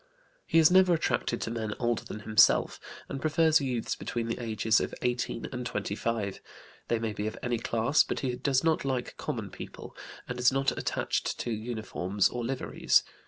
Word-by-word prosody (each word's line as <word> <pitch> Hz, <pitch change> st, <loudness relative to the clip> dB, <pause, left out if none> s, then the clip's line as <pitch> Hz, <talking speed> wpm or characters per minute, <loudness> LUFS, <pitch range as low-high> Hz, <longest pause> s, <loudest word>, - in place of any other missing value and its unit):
He -, -, +2 dB
is 160 Hz, +1 st, +7 dB
never 185 Hz, -1 st, +6 dB
attracted 120 Hz, -5 st, -1 dB
to 115 Hz, -, -3 dB
men 110 Hz, -2 st, -3 dB
older 120 Hz, -2 st, 0 dB
than 105 Hz, -, -7 dB
himself, 105 Hz, 0 st, +4 dB, 0.3 s
and 135 Hz, -, -5 dB
prefers 160 Hz, 0 st, +3 dB
youths 125 Hz, -4 st, -2 dB
between 120 Hz, -1 st, -3 dB
the 115 Hz, -, -2 dB
ages 110 Hz, -1 st, +2 dB
of -, -, -3 dB
18 120 Hz, -1 st, -1 dB
and 125 Hz, -1 st, -4 dB
25. 105 Hz, -2 st, -3 dB, 0.5 s
They 115 Hz, -, +1 dB
may 110 Hz, -1 st, -2 dB
be 105 Hz, +1 st, -3 dB
of 110 Hz, -, -5 dB
any 120 Hz, -2 st, 0 dB
class, 115 Hz, +7 st, +2 dB
but -, -, -3 dB
he 125 Hz, -2 st, -1 dB
does 135 Hz, +1 st, +1 dB
not 160 Hz, -1 st, +2 dB
like 130 Hz, -3 st, -2 dB
common -, -, -4 dB
people, -, -, -9 dB, 0.3 s
and 125 Hz, 0 st, -5 dB
is 125 Hz, +1 st, +5 dB
not 135 Hz, 0 st, +1 dB
attached -, -, -1 dB
to 120 Hz, -, -3 dB
uniforms 110 Hz, -4 st, -1 dB
or 120 Hz, -1 st, -4 dB
liveries. 130 Hz, +2 st, +2 dB
120 Hz, 180 wpm, -29 LUFS, 110-135 Hz, 0.5 s, is